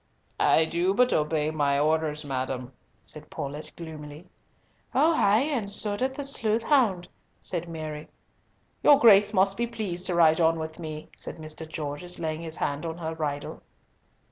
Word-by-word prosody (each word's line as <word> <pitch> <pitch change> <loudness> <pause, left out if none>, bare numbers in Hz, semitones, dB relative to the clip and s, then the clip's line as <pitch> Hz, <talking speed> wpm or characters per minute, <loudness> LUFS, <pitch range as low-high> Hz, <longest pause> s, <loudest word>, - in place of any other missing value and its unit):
"I 160 - +5
do 175 +4 0
but 250 +3 +4
obey 150 0 +1
my 145 -2 +1
orders, 155 0 0
madam," 130 -1 -3 0.3
said - - -3
Paulett, 145 +2 -6
gloomily. 155 -1 -9 0.7
"Oh 310 +5 +4
ay, 210 -5 +4
and 270 -8 -1
so 205 0 +2
does 260 +4 -1
the 285 - -5
sleuth 230 -5 +1
hound," 215 -12 +2 0.3
said 175 -1 -3
Mary. 155 -2 -6 0.7
"Your 290 - +7
Grace 210 -6 +6
must 195 -1 +2
be 235 +1 0
pleased 205 -7 -4
to 180 - -1
ride 160 -1 +5
on 165 0 +3
with 160 +1 -6
me," 155 -2 -7
said - - -7
Mr. 155 0 -8
Gorges, 150 +3 -5
laying 160 -1 -3
his 160 -1 -5
hand 145 +2 -2
on 165 0 -4
her 160 -1 -4
bridle. 145 -3 -4
165 Hz, 165 wpm, -27 LUFS, 155-205 Hz, 0.7 s, Your